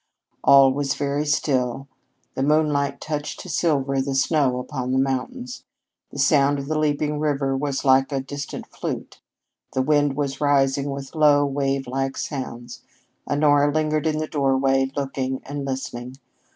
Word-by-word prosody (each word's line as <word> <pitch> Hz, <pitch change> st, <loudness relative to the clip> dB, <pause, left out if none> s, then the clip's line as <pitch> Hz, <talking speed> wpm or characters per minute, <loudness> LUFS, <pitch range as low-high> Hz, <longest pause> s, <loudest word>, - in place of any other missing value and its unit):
All 135 Hz, -1 st, +7 dB
was 140 Hz, 0 st, -1 dB
very 145 Hz, +1 st, -1 dB
still. 135 Hz, -3 st, 0 dB, 0.5 s
The -, -, -3 dB
moonlight 145 Hz, -1 st, +1 dB
touched 150 Hz, -1 st, -4 dB
to -, -, -10 dB
silver 135 Hz, -5 st, +1 dB
the 135 Hz, 0 st, -2 dB
snow 135 Hz, -1 st, +2 dB
upon 125 Hz, 0 st, -4 dB
the -, -, +2 dB
mountains; 135 Hz, -, -2 dB, 0.5 s
the -, -, -11 dB
sound 145 Hz, -2 st, +3 dB
of 140 Hz, -, -5 dB
the 155 Hz, +2 st, -1 dB
leaping 150 Hz, 0 st, 0 dB
river 140 Hz, -3 st, 0 dB
was 140 Hz, 0 st, -2 dB
like 135 Hz, +1 st, +4 dB
a 135 Hz, -, 0 dB
distant 145 Hz, +2 st, -6 dB
flute; -, -, -6 dB, 0.5 s
the 130 Hz, -, +1 dB
wind 145 Hz, -1 st, +2 dB
was 140 Hz, -1 st, -3 dB
rising 140 Hz, -1 st, +2 dB
with 140 Hz, -1 st, -6 dB
long, 145 Hz, -3 st, +4 dB
wavelike 135 Hz, -1 st, -1 dB
sounds. 120 Hz, -4 st, -6 dB, 0.5 s
Honora 145 Hz, 0 st, +3 dB
lingered 155 Hz, +1 st, 0 dB
in 155 Hz, -1 st, 0 dB
the 155 Hz, -, -1 dB
doorway, 135 Hz, -2 st, +1 dB
looking 135 Hz, -1 st, -2 dB
and 140 Hz, 0 st, -5 dB
listening. 130 Hz, -1 st, -5 dB
140 Hz, 150 wpm, -23 LUFS, 135-145 Hz, 0.5 s, All